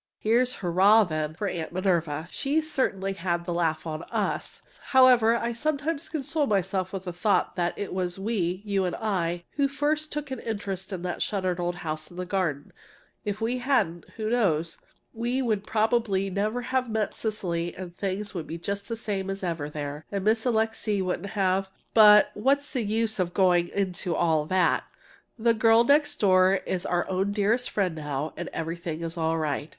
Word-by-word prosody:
Here's 245 +3 +2
"Hurrah!" 195 +5 +5
then, 155 -3 -3
for 205 +4 -2
Aunt 165 -4 -4
Minerva! 170 -4 0
She 285 +3 0
certainly 215 -11 -1
had 175 -2 -2
the 175 - -2
laugh 165 -2 0
on 155 -1 -4
us! - - -2 0.3
However, 250 -3 +7
I 235 0 -1
sometimes 300 +4 -2
console 305 -1 -1
myself 190 -2 0
with 195 -2 -5
the 180 -2 -5
thought 200 +4 +1
that 175 -1 -1
it 205 - -4
was 180 -1 -1
we 195 -3 -1
(you 200 -2 +1
and 180 - -2
I) 175 -5 -1
who 280 -1 +3
first 295 +3 -1
took 295 -2 -4
an 260 - -3
interest 200 -4 -4
in 180 -2 -5
that 180 -1 -3
shuttered 185 -3 -1
old 175 0 -1
house 155 0 -4
in 175 - -14
the 180 - -3
garden. 175 -7 -2 0.5
If 205 +1 -3
we 240 +3 0
hadn't 220 - +1
who 220 0 -2
knows? 170 -9 +1 0.4
we 240 +3 -1
would 220 -6 0
probably 215 -3 +1
never 215 +5 -1
have 255 0 -1
met 220 -2 -1
Cecily, 175 -6 -2
and 180 -2 -8
things 200 +2 -3
would 170 -5 -5
be 165 - -5
just 200 +3 -4
the 230 - -3
same 195 -3 -3
as 195 0 -4
ever 165 -5 -2
there, 150 0 -6
and 200 -2 -2
Miss 220 +3 +2
Alixe 220 -2 0
wouldn't 185 +2 -3
have 190 0 +1 0.2
But 210 -1 +8
what's 280 +7 +1
the 255 - 0
use 220 0 0
of 175 -1 -1
going 180 -3 +4
into 185 -2 -2
all 160 -3 +2
that! 185 0 +2 0.5
The 230 0 +3
"girl 225 +1 +5
next 290 +3 +3
door" 185 -1 +5
is 180 -1 -2
our 175 0 0
own 190 +2 0
dearest 220 +4 +1
friend 190 -4 0
now, 150 -1 -4
and 175 - -5
everything 165 0 -4
is 165 0 -4
all 165 -1 0
right. 155 -1 -2
195 Hz, 185 wpm, -27 LUFS, 175-225 Hz, 0.5 s, But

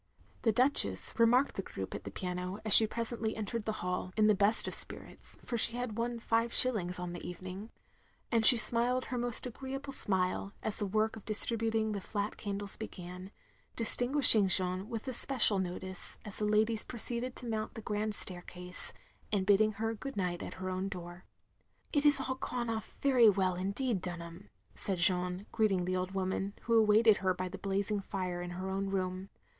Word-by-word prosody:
" - - -32
The 225 - +3
Duchess 205 - +2
remarked 245 +4 +4
the - - 0
group 95 - -7
at - - -7
the - - -5
piano, 180 - -4
as 215 - +5
she 220 - +11
presently 230 0 -3
entered 220 +1 -4
the 220 - -1
hall, 180 0 -3
(in 215 - +4
the 215 - +5
best 205 +3 +4
of - - -4
spirits, - - -1
for 235 - -2
she 230 - +1
had 245 -3 -4
won 235 +1 -2
five 230 +1 0
shillings 205 -10 +1
on 180 -1 -5
the 175 - -8
evening) 185 +4 -8 0.6
and 230 -2 +2
she 245 +2 +10
smiled 240 +3 +1
her 250 - -4
most 240 0 -2
agreeable 270 +3 -5
smile, 190 -2 +1
as 220 - +3
the 205 - -1
work 215 +2 0
of 220 - -12
distributing 225 0 0
the 200 -2 -4
flat 205 +1 -3
candles 200 -1 -2
began, 180 -3 -8 0.5
distinguishing 245 -2 +3
Jeanne 185 +2 +2
with 230 +1 -5
especial 255 -5 +4
notice 185 0 -6
as 210 - -9
the 210 - -1
ladies 215 +1 +2
proceeded 240 +1 -2
to - - -9
mount 220 -2 -4
the - - -6
grand 210 0 -2
staircase; 180 -1 -3 0.4
and 195 -3 0
bidding 210 +2 +4
her 225 +2 -2
good 270 +4 -7
night 180 -2 -2
at - - -7
her 185 0 -6
own 185 +1 -3
door. 175 -1 -9 0.3
" - - -38
It 290 -1 +1
has 290 -1 +5
all 260 0 -2
gone 240 -3 -3
off 220 -2 -6
very 255 -5 +6
well, 190 -2 +1
indeed, 200 +4 -2
Dunham, 175 0 -8
" - - -43
said 195 -2 -3
Jeanne, 180 +1 0
greeting 195 -5 +1
the 185 +1 -1
old 185 0 -2
woman, 190 +1 -2
who 230 - -1
awaited 215 0 +5
her 185 -1 0
by 185 +1 -3
the 190 +1 -8
blazing 200 +1 -1
fire 185 -3 -4
in 175 - -5
her 185 +1 -4
own 195 +1 -2
room. 185 0 -3
205 Hz, 195 wpm, -32 LUFS, 185-230 Hz, 0.6 s, she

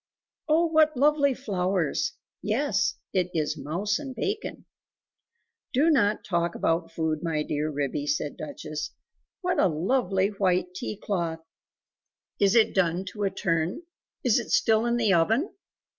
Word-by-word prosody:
"Oh, 325 +3 +4
what 310 -3 +3
lovely 285 -1 +3
flowers! 185 - -1 0.3
Yes, - - +1 0.2
it 180 -2 +1
is 155 -1 0
mouse 170 +9 -2
and 270 -3 -7
bacon!" 410 - -3 1.1
"Do 295 +6 +4
not 215 -8 +2
talk 170 -2 0
about 165 0 0
food, 160 -2 -1
my 160 -3 -1
dear 150 +1 -2
Ribby," 145 0 -2
said 145 0 -1
Duchess; 150 +1 -6 0.5
"what 360 -1 0
a - - +5
lovely 190 +3 +1
white 185 -3 0
tea 210 +2 -5
cloth!.... 170 -6 -3 0.9
Is 200 +2 +4
it 225 -2 +5
done 180 0 +1
to 210 - -8
a - - +2
turn? 175 - -1 0.4
Is - - +4
it - - -6
still 225 0 +3
in 240 0 +1
the 220 -5 +3
oven?" 225 - +2
190 Hz, 145 wpm, -27 LUFS, 165-240 Hz, 1.1 s, a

